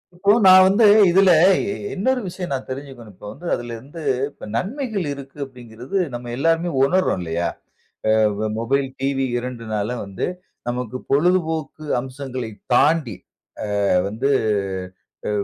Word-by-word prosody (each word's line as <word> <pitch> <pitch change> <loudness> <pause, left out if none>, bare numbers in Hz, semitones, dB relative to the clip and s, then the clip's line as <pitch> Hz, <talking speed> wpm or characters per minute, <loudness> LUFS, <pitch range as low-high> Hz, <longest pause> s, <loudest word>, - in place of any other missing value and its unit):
இப்போ 200 +3 +3
நான் 185 0 +9
வந்து 210 +3 +4 0.2
இதில 190 +1 +5 0.3
இ - - -2 0.3
இன்னொரு 250 +6 +1
விஷயம் 175 -7 -4
தெரிஞ்சிக்கணும். 130 -5 -8
இப்ப - - -13
வந்து 175 - -12
அதில 120 -1 -3
வந்து 155 +4 -10 0.5
நன்மைகள் 215 - -2
இருக்கு 140 0 -9
அப்பிடிங்கிறது 125 - -7 0.2
நம்ம 120 0 -6
எல்லாருமே 165 +3 +1 0.2
உணர்றோம் 185 - +1
இல்லயா! 85 +1 -2 0.6
அ - - +5 0.5
மொபைல், 135 +4 0
டிவி 135 0 0
இரண்டுனால 115 -4 -4 0.2
வந்து 95 -1 -4 0.4
நமக்கு 125 0 -3
பொழுதுபோக்கு 160 -1 +1
அம்சங்களை 130 -3 -6 0.2
தாண்டி, 145 - +3 0.7
அ - - +2 0.2
வந்து 115 +7 -1 1.0
அ - - 0
135 Hz, 120 wpm, -21 LUFS, 120-175 Hz, 1.0 s, நான்